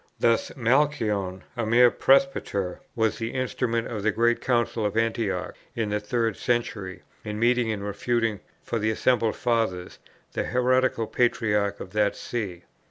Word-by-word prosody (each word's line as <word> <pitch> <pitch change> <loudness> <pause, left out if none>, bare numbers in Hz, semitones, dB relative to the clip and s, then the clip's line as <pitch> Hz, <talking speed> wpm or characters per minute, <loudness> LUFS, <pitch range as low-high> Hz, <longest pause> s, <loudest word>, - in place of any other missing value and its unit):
Thus 115 -1 +2
Malchion, 115 -8 +1
a 120 - -2
mere 120 +2 +5
presbyter, 135 - +1 0.2
was 110 -1 +1
the 115 +2 -4
instrument 115 -2 -1
of 110 -3 -4
the 110 - +2
great 115 +3 +2
Council 120 -2 0
of 105 +1 -1
Antioch 110 -5 -1 0.2
in 115 -3 -1
the 105 - +1
third 115 0 -1
century 105 -6 -2 0.2
in 105 0 -4
meeting 120 0 +2
and 105 -2 -4
refuting, 110 +1 -1 0.2
for 115 - -2
the 110 +1 +1
assembled 115 0 +1
Fathers, 110 -7 -1 0.3
the - - -1
heretical 125 -1 +2
Patriarch 105 -4 +1
of 95 - -8
that 105 -1 +2
see. 95 -7 -5
115 Hz, 150 wpm, -26 LUFS, 105-120 Hz, 0.3 s, mere